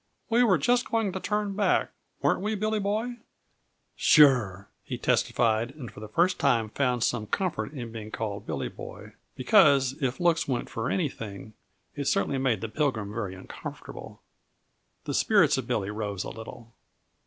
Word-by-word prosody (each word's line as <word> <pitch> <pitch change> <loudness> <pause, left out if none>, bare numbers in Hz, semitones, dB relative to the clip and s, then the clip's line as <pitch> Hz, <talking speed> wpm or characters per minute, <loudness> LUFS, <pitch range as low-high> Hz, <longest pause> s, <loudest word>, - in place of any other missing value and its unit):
"We 235 +2 +4
were 195 -7 +4
just 245 0 +1
going 225 -4 +1
to 190 - -4
turn 210 0 -1
back 205 - +2 0.3
weren't - - +2
we, 215 +2 -1
Billy 215 +1 0
Boy?" 215 +5 -2 0.8
"Sure!" 120 -10 +5 0.2
he - - -5
testified, 115 0 +1
and 130 -7 -8
for - - -12
the 110 - -7
first 175 - +1
time 115 -5 +2
found 125 -1 0
some 115 -3 0
comfort 150 - -2
in 120 -5 -6
being 110 -1 -7
called 105 -2 -5
Billy - - -2
Boy; - - -10 0.2
because, 135 -2 +5
if 130 +2 -1
looks 170 -2 +2
went 125 -3 -2
for 115 +3 -2
anything, 110 - -4 0.4
it 145 - -3
certainly 135 0 +1
made 130 -6 +1
the 115 - -3
Pilgrim 110 -6 -1
very 105 -4 -4
uncomfortable. 95 - -9 0.8
The - - -4
spirits - - +4
of - - -6
Billy 100 +1 -1
rose 105 -3 -3
a - - -6
little. 115 +1 -10
125 Hz, 165 wpm, -27 LUFS, 110-185 Hz, 0.8 s, Sure